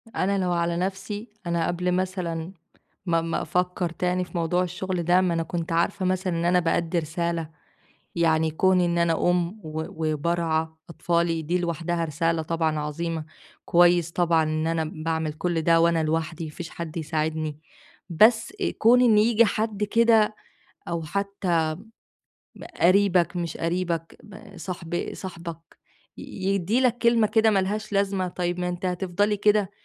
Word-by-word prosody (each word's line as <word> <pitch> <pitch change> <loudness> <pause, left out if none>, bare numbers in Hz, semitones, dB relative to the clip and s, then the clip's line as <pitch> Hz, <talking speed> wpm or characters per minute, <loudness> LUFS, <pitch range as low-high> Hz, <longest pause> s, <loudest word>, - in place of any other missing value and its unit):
أنا 200 +1 +1
لو 185 -2 0
على 170 0 0
نَفسي، 195 +4 -4 0.2
أنا 170 -1 0
قبْل 180 +1 -1
مثلًا 180 -2 -2 0.5
ما 165 -1 +2
ما 165 0 -2
أفكّر 180 0 -1
تاني 180 +2 -1
في - - -19
موضوع 175 +2 +1
الشغل 185 0 -3
ده، 175 +2 +4
ما 180 -2 +1
أنا 165 0 0
كنت 170 0 -4
عارفة 180 +3 0
مثلًا 185 0 0
إن 170 - -1
أنا 180 +1 +4
بأدّي 170 0 0
رسالة، 165 0 -3 0.7
يعني 160 -1 +2
كُون 185 +3 +3
إن 170 -1 +1
أنا 170 -1 +2 0.2
أُم 175 -1 +1 0.2
و 155 0 -4 0.3
وبارعى 160 +1 0 0.2
أطفالي 170 -1 0
دي 170 +4 0
لوحدها 170 -1 -2
رسالة 165 +2 0
طبعًا 160 -1 -1
عظيمة، 160 +2 -3 0.4
كويس 175 -1 +4
طبعًا 170 -2 +2
إن 155 +1 -1
أنا 165 -1 0 0.2
باعمل 160 -1 -1
كلّ 165 +1 -1
ده 165 0 +4
وأنا 170 -1 +3
لوحدي، 160 +1 -2
ما 155 - -7
فيش 170 +2 -8
حد 170 -1 -7
يساعدني، 155 -1 -2 0.5
بس 220 +6 +4
آآ، - - +1
كُون 245 +3 +6
إن 230 -4 +5
ييجي 230 +2 +5
حد 215 -1 -1
كده 220 0 +3 0.5
أو 170 -1 -3
حتى 190 -1 -1 1.2
قريبك 180 -1 +3
مش 170 -2 -3
قريبك 170 -1 -2
ب 200 -1 -13
صاحب 175 -2 -4
صاحبك، 170 -3 -9 0.4
ي - - -7 0.3
يدِّي 200 +7 +1
لك 245 -2 +2
كلمة 235 -2 +3
كده 220 +1 +3
ما 205 - +2
لهاش 210 +2 -3
لازمة، 195 -2 0
طيب 175 0 -3
"ما 180 - -1
أنتِ 180 +1 -3
هتفضَلي 190 +3 0
كده؟!" 210 -1 +2
175 Hz, 155 wpm, -25 LUFS, 165-190 Hz, 1.2 s, كُون